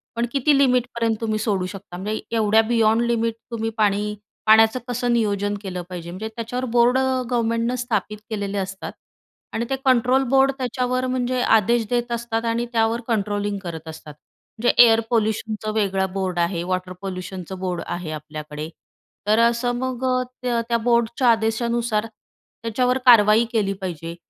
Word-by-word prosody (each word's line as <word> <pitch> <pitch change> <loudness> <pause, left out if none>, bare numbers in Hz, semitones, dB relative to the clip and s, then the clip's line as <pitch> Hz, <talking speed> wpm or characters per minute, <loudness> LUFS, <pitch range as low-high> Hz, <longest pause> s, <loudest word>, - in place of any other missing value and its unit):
पण 235 +1 0
किती 280 +2 +3
लिमिटपर्यंत 250 -4 +2
तुम्ही 220 -1 0
सोडू 205 -4 0
शकता? 185 -1 -8
म्हणजे 210 +4 -3 0.2
एवढ्या 220 0 +4
बियॉन्ड 225 -1 +3
लिमिट 230 -1 0 0.2
तुम्ही 225 -1 -2
पाणी 210 0 +1 0.3
पाण्याचं 220 +2 +6
कसं 245 0 -1
नियोजन 205 -3 0
केलं 185 -3 -5
पाहिजे. 170 -2 -7
म्हणजे 195 +5 -5
त्याच्यावर 245 +2 -3
बोर्ड 245 +1 +4 0.3
गव्हर्मेंटनं 230 0 0
स्थापित 220 -4 -2
केलेले 205 -2 -3
असतात 195 0 -4 0.6
आणि 235 - -1
ते 270 - +1
कंट्रोल 255 +1 +4
बोर्ड 270 +1 +4
त्याच्यावर 255 0 -1
म्हणजे 255 0 -1
आदेश 225 +1 +3
देत 240 -1 -1
असतात 235 -1 -2
आणि 230 +1 0
त्यावर 225 +1 +1
कंट्रोलिंग 205 -2 -1
करत 165 -2 -7
असतात. 155 -1 -9 0.5
म्हणजे 240 +2 +3
एअर 225 -1 +5
पोल्यूशनचं 220 -1 -1
वेगळं 195 -3 0
बोर्ड 190 -2 -2
आहे, 170 0 0
वॉटर 185 0 -3
पोल्यूशनचं 185 -1 -6
बोर्ड 180 -2 -3
आहे 175 -2 -4
आपल्याकडे, 150 0 -7 0.6
तर 215 +2 +4
असं 240 +1 -1
मग 255 0 -3
अ, 255 0 +1 0.2
त्या 240 -2 0
त्या 235 - +3
बोर्डच्या 235 +1 +1
आदेशानुसार, 225 0 0 0.6
त्याच्यावर 250 +3 +1
कारवाई 225 -2 +7
केली 205 -3 +1
पाहिजे 170 -2 -5
225 Hz, 150 wpm, -22 LUFS, 195-240 Hz, 0.6 s, कारवाई